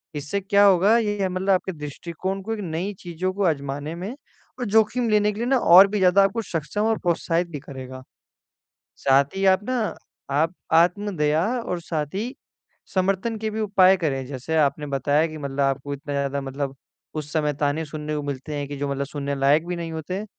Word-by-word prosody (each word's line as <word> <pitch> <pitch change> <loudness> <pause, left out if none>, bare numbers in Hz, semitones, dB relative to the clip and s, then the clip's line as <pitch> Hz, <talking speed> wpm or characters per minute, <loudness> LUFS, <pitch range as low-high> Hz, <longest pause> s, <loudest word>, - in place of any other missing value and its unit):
इससे 150 +7 -2
क्या 200 +1 +4
होगा 200 +3 +5
ये 205 -4 0
मतलब 185 +2 -3
आपके 190 0 +2
दृष्टिकोण 170 +5 -5
को 220 +4 -3
एक 220 - -5
नई 175 +4 -3
चीज़ों 175 +2 -3
को 200 +1 -1
आज़माने 145 0 -2
में 190 +8 -6 0.4
और 245 - -2
जोखिम 225 +3 +2
लेने 210 -1 +3
के 205 - -10
लिए 235 - -1
ना 265 +1 +3
और 190 -3 +8
भी 210 0 -2
ज़्यादा 190 +1 +5
आपको 195 +4 0
सक्षम 175 0 -3
और 225 - +1
प्रोत्साहित 170 0 0
भी 150 - -5
करेगा। 130 -1 -9 1.0
साथ 140 +4 +3
ही 195 - 0
आप 190 +1 +4
ना 255 - +1 0.5
आप 160 +5 +1 0.3
आत्मदया 170 -4 +1 0.2
और 180 -7 -4
साथ 155 -3 -2
ही 235 +6 -3 0.6
समर्थन 195 +4 0
के 220 0 -2
भी 215 - -4
उपाय 195 -2 +5
करें 135 -7 -1
जैसे 135 +4 -4
आपने 145 0 +1
बताया 145 +4 +2
कि 155 -1 -8
मतलब 140 -1 -5
आपको 135 +1 0
इतना 145 +1 -6
ज़्यादा 140 0 -1
मतलब 135 0 -4 0.4
उस 150 -1 -5
समय 150 -2 +1
ताने 145 +3 0
सुनने 150 0 -5
को 150 - -2
मिलते 145 +1 -5
हैं 145 -1 -3
कि 145 0 -6
जो 140 0 -2
मतलब 140 0 -2
सुनने 140 0 -4
लायक 145 +4 +3
भी 180 - -2
नहीं 170 -1 -5
होते। 180 +6 -4
165 Hz, 195 wpm, -24 LUFS, 145-195 Hz, 1.0 s, और